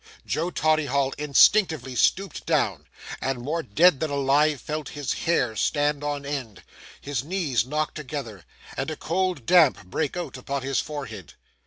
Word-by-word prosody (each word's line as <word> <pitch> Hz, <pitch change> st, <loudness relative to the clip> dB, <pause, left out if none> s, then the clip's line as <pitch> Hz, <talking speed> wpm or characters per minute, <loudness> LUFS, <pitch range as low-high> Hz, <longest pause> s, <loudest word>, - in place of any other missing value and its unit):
Joe 165 Hz, +3 st, -1 dB
Toddyhigh 145 Hz, -5 st, +1 dB
instinctively 150 Hz, -, +4 dB
stooped 195 Hz, +9 st, +1 dB
down, 105 Hz, -, 0 dB, 0.3 s
and, 135 Hz, -1 st, -1 dB
more 150 Hz, +7 st, -2 dB
dead 155 Hz, -, +4 dB
than 160 Hz, -, -1 dB
alive, 140 Hz, +1 st, +2 dB
felt 150 Hz, +2 st, -5 dB
his 145 Hz, -3 st, -1 dB
hair 125 Hz, -9 st, 0 dB
stand 145 Hz, +4 st, 0 dB
on 145 Hz, -1 st, -3 dB
end, 135 Hz, -7 st, -5 dB, 0.4 s
his 140 Hz, -3 st, -3 dB
knees 145 Hz, -, -1 dB
knock 150 Hz, +2 st, -1 dB
together, 135 Hz, -, -6 dB, 0.3 s
and 135 Hz, +3 st, -2 dB
a 155 Hz, -, -3 dB
cold 175 Hz, -4 st, -1 dB
damp 135 Hz, -, +4 dB
break 145 Hz, -, -2 dB
out 175 Hz, -6 st, -5 dB
upon 135 Hz, +1 st, -4 dB
his 135 Hz, 0 st, 0 dB
forehead. 120 Hz, -, -6 dB
145 Hz, 150 wpm, -25 LUFS, 130-155 Hz, 0.4 s, instinctively